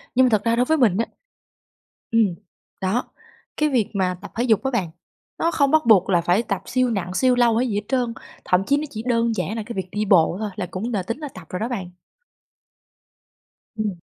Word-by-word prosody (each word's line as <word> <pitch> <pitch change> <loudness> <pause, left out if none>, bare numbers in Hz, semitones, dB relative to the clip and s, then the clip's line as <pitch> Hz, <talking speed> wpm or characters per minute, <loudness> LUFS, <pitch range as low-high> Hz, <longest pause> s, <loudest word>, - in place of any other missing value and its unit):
Nhưng 260 - +6
mà 250 - +3
thật 215 -2 +2
ra 230 0 +2
đối 245 +1 +2
với 315 +2 +2
mình 215 -8 +3
á 230 - +1 1.1
ừm, 215 -6 +3 0.5
đó, 195 +7 -1 0.5
cái 305 0 +2
việc 240 -7 +1
mà 185 -2 0
tập 200 - -9
thể 240 - 0
dục 225 -2 +2
á 265 - 0
bạn, 190 -9 -1 0.5
nó 335 - +2
không 280 -4 +2
bắt 315 -3 +3
buộc 200 -5 +5
là 175 -2 +3
phải 180 +7 +2
tập 200 -3 -3
siêu 255 0 +1
nặng, 185 -5 -2
siêu 255 +4 +3
lâu 235 -2 +3
hay 250 +1 +1
gì 210 - -2
hết 205 - 0
trơn. 250 -3 0 0.3
Thậm 180 +1 +2
chí 285 - +3
nó 300 - -2
chỉ 220 -3 -6
đơn 230 -1 +2
giản 195 +3 -2
là 220 - -3
cái 235 - -6
việc 190 -1 -3
đi 210 +1 -1
bộ 180 -2 +4
thôi 215 -1 -2
là 195 - -3
cũng 225 +6 -4
là 195 -3 0
tính 230 +7 -4
là 295 -2 -5
tập 160 - -12
rồi 180 - -4
đó 225 - -1
bạn. 190 -7 -4 1.9
Ừm. 205 -5 -2
220 Hz, 235 wpm, -22 LUFS, 190-245 Hz, 1.9 s, Nhưng